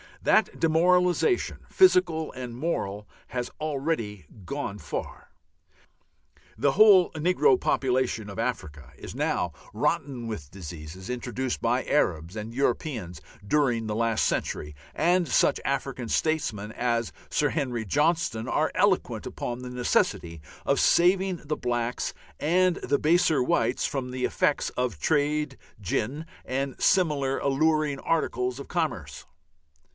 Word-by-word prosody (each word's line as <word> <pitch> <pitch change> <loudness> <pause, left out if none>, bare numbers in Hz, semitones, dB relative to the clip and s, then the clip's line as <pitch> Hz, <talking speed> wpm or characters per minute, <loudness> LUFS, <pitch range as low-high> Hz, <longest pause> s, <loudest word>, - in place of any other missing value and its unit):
That - - +2
demoralization, 180 - +2
physical 180 - +4
and 125 -2 -6
moral, 105 -8 -3 0.2
has 120 +1 -4
already 140 - -2 0.2
gone 140 -4 -4
far. - - -6 1.3
The 140 - +2
whole 200 -4 +7
negro 180 - +3
population 125 -5 0
of 100 - -8
Africa 80 - -4
is - - -9
now 90 - 0 0.2
rotten 125 -5 -1
with 85 -11 -6
diseases 85 0 -9
introduced 125 +1 -3
by 120 +2 +1
Arabs 85 - 0
and 110 +1 -6
Europeans 120 - -2 0.3
during 125 -4 +2
the 105 -1 -2
last 115 0 +1
century, 75 0 -2 0.2
and 175 0 +2
such 125 - +3
African 135 -3 -2
statesmen 110 -11 -1
as 120 -1 -1 0.2
Sir 145 - +1
Harry 125 -7 -2
Johnston 150 - +1
are - - +1
eloquent - - +1
upon 120 0 -5
the 125 0 -7
necessity 85 -9 0 0.3
of - - +3
saving 185 +1 +3
the 150 +1 -2
blacks 120 0 -2 0.3
and 180 +3 +3
the 140 - 0
baser 160 -2 +3
whites 120 -1 +1
from 130 -2 -3
the 125 0 -1
effects 145 - +1
of 125 -1 -2
trade 150 -2 0 0.2
gin 120 - -2 0.2
and 135 0 -3
similar 145 -7 +2
alluring 150 0 +1
articles 125 -6 -1
of 140 - -8
commerce. 150 - -3
130 Hz, 125 wpm, -27 LUFS, 115-155 Hz, 1.3 s, whole